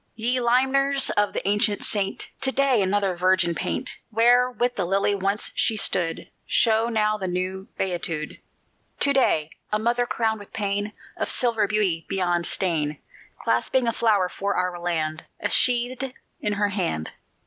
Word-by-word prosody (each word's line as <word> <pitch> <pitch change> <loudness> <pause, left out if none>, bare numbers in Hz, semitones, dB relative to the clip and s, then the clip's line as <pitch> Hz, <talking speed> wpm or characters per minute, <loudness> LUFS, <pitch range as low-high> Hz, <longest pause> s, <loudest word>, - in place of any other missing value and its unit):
Ye 240 +3 +3
limners 265 +3 +3
of 205 -1 +1
the - - -4
ancient 205 0 +1
saint! 200 -2 +1 0.2
To 265 - +3
day 265 -5 +2
another 195 -1 0
virgin 185 -1 +2
paint; - - -2
Where 240 +3 +4
with 245 0 -1
the 190 - -1
lily 195 +3 +1
once 200 +1 -2
she 220 - +1
stood 175 -4 0 0.2
Show 225 0 +3
now 215 -2 0
the 190 - -3
new 185 +2 -3
beatitude. 170 -4 -3 0.6
To 280 - +3
day 160 - +2 0.2
a 210 - +2
mother 240 +2 0
crowned 220 -2 -1
with 205 - -13
pain, 205 0 -2 0.2
Of - - -2
silver 225 -4 +2
beauty 195 -7 0
beyond 175 -3 0
stain, 155 -5 -1 0.4
Clasping 240 - +1
a 230 - +1
flower 215 -5 +2
for 200 +2 -3
our 180 -1 -2
land 160 -2 -3
A - - -2
sheathèd 250 +1 +1 0.2
in 210 - -1
her 205 0 0
hand. 175 - -3
205 Hz, 160 wpm, -24 LUFS, 185-235 Hz, 0.6 s, Where